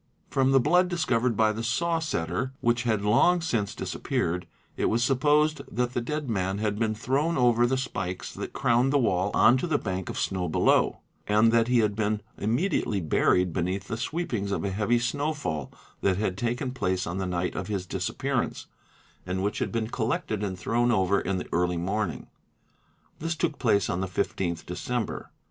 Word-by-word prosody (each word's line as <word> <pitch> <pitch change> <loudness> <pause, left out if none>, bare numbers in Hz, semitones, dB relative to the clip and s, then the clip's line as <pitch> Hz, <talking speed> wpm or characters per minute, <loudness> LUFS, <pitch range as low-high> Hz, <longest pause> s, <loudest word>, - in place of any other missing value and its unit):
From 135 -1 +3
the 135 - +6
blood 175 +7 +4
discovered 125 - 0
by 110 -1 +4
the 110 +2 -4
saw 165 +9 +1
setter, 130 - -2
which 120 +1 +1
had 110 -3 +1
long 120 +12 +4
since 115 - -1
disappeared, 90 +2 -2 0.3
it - - -1
was 115 +2 +2
supposed 150 +4 +3
that 125 +1 -1
the 120 - 0
dead 150 +4 -3
man 95 -3 -1
had 105 0 -1
been 110 -1 0
thrown 140 +9 0
over 120 -1 +4
the 130 +2 +1
spikes 100 -8 -4
that - - -6
crowned 120 +3 +2
the 145 - +4
wall 95 -7 +1
on 120 +3 +6
to 155 - -2
the 155 -3 +2
bank 95 -5 -4
of - - -5
snow 90 -2 -1
below, - - +2 0.3
and 105 +2 +4
that 115 0 +3
he 125 -1 +4
had 105 -2 0
been 105 0 0 0.2
immediately 115 - 0
buried 90 +1 +2
beneath 95 +2 -2
the - - -1
'sweepings 120 - -2
of - - -1
a 100 - -1
heavy 105 +4 +1
snowfall 120 - -2 0.3
that 95 -2 +2
had 100 -3 -1
taken 120 +4 -2
place 95 -8 -1
on 85 +3 -3
the 95 - -2
night 90 0 -1
of 90 - -4
his 100 -4 -2
disappearance - - -2 0.6
and 95 +1 -2
which 105 - -1
had - - -1
been 115 -2 -1
collected 110 -2 -2
and 95 -2 -3
thrown 120 +5 +1
over 100 -2 +2
in 95 +1 -1
the 90 - -5
early 90 0 +1
morning. 95 0 -2 0.9
'This 165 +2 -2
took 150 -1 -1
place 100 -6 +2
on 90 - -1
the 95 - -1
15th 85 -1 -2
December. 115 +6 -3
110 Hz, 190 wpm, -27 LUFS, 95-130 Hz, 0.9 s, the